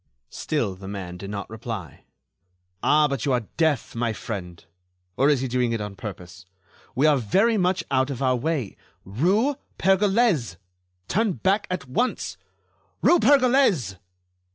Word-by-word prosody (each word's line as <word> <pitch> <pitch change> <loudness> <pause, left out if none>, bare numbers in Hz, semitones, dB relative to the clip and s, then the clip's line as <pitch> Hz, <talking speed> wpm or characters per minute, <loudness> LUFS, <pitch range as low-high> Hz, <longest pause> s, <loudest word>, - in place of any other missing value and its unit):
Still 120 -11 -2
the 95 +1 -11
man 95 -3 -6
did 100 +2 -8
not 100 -1 -5
reply. 110 -6 -7 0.8
"Ah! 150 0 +4
but 140 -5 -3
you 135 - +1
are 120 -3 0
deaf, 160 -6 +1
my 115 -1 -1
friend. 90 -7 -7 0.5
Or 135 +6 +3
is 140 -4 +2
he 130 - -1
doing 125 -1 0
it 115 - -1
on 105 -1 -6
purpose? 90 -4 -9 0.5
We 135 +4 +2
are 150 -2 +5
very 195 - +2
much 185 -2 +1
out 130 0 +2
of 135 -4 -4
our 130 -2 +2
way.... 135 -3 -2 0.3
Rue 195 - +1 0.2
Pergolese!... 195 - +2 0.5
Turn 215 -1 +1
back 195 +5 0
at 180 -7 -4
once!... 245 - -1 0.7
Rue 350 - +5
Pergolese!" 245 - +3
130 Hz, 150 wpm, -24 LUFS, -, 0.8 s, are